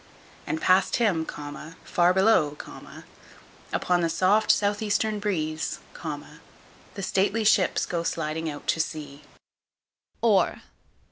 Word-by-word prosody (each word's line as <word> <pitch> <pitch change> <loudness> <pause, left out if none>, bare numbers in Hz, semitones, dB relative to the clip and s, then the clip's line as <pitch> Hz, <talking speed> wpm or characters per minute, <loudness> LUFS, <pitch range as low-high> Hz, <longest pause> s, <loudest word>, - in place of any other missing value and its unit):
And 160 - -1
past 185 +3 +3
him, 185 -9 +1 0.6
far 175 0 +3
below, 185 -6 +3 1.1
upon 180 -1 +1
the 165 - +1
soft 205 +5 +2
south 205 0 +3
eastern 215 0 0
breeze, 155 -6 -2 1.2
the 195 - -5
stately 195 +4 +1
ships 200 -3 +3
go 170 -1 -2
sliding 160 -1 -2
out 145 -1 -8
to - - +2
sea. 150 -3 -4 1.0
_OR. - - +3
185 Hz, 110 wpm, -26 LUFS, 160-205 Hz, 1.2 s, past